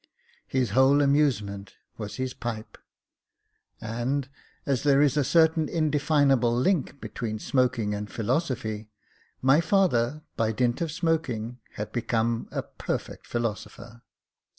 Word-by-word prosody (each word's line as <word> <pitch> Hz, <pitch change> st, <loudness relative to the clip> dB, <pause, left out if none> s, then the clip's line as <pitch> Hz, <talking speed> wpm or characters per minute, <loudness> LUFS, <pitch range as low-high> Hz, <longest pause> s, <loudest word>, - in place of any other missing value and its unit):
His 125 Hz, -5 st, 0 dB
whole 130 Hz, +4 st, +5 dB
amusement 120 Hz, -9 st, +1 dB, 0.2 s
was 105 Hz, -2 st, -6 dB
his 130 Hz, -1 st, -3 dB
pipe; 115 Hz, -3 st, -6 dB, 1.0 s
and, 120 Hz, +5 st, -2 dB, 0.4 s
as 135 Hz, -4 st, +1 dB
there 140 Hz, -2 st, +4 dB
is 145 Hz, -1 st, +4 dB
a 145 Hz, -, +3 dB
certain 160 Hz, +1 st, +3 dB
indefinable 145 Hz, -6 st, +2 dB
link 145 Hz, 0 st, +1 dB
between 110 Hz, -4 st, -4 dB
smoking 120 Hz, -3 st, 0 dB
and 105 Hz, -1 st, -5 dB
philosophy, 115 Hz, -3 st, -2 dB, 0.5 s
my 135 Hz, +4 st, +5 dB
father, 155 Hz, -, +2 dB
by 110 Hz, -1 st, 0 dB
dint 120 Hz, +4 st, 0 dB
of 165 Hz, -2 st, -1 dB
smoking, 140 Hz, -9 st, -1 dB, 0.2 s
had 105 Hz, 0 st, -5 dB
become 115 Hz, -1 st, -1 dB
a -, -, -2 dB
perfect -, -, -5 dB
philosopher. 115 Hz, 0 st, -4 dB
125 Hz, 120 wpm, -27 LUFS, 115-145 Hz, 1.0 s, whole